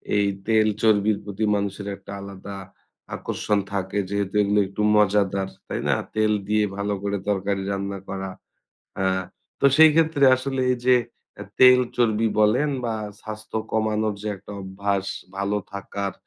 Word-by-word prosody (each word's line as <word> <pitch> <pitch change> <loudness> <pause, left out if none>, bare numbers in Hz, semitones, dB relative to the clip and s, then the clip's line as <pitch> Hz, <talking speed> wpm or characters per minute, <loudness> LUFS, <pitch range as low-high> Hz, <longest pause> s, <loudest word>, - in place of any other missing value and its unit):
এই 100 -1 +3 0.2
তেল 110 -1 +4
চর্বির 110 -1 +3
প্রতি 105 +1 -2
মানুষের 100 0 -3
একটা 100 +1 -12
আলাদা 100 0 -8 0.6
আকর্ষণ 105 -1 -1
থাকে 95 +1 -2
যেহেতু 100 0 -2
এগুলো 105 0 +2
একটু 100 +2 -5
মজাদার। 100 -2 +2 0.2
তাই - - -3
না? - - +4 0.2
তেল 110 0 +2 0.2
দিয়ে 105 0 +2
ভালো 100 0 -1
করে 100 0 -1
তরকারি 100 0 0
রান্না 100 0 -3
করা। 95 0 -4 0.7
আ - - +1 0.6
তো 140 - +5
সেই 160 0 +9
ক্ষেত্রে 160 -3 +3
আসলে 135 +1 -3
এই - - -1
যে 130 - +7 0.4
অ্যা - - -8 0.2
তেল 125 0 +8 0.2
চর্বি 115 -2 +2
বলেন 120 +8 +3 0.2
বা 115 - -1 0.3
স্বাস্থ্য 110 0 -5
কমানোর 110 -1 0
যে 105 - -3
একটা 100 +2 -11
অভ্যাস 95 +1 -2 0.3
ভালো 100 +1 -1 0.2
থাকার 100 0 -4
105 Hz, 150 wpm, -24 LUFS, 100-110 Hz, 0.7 s, সেই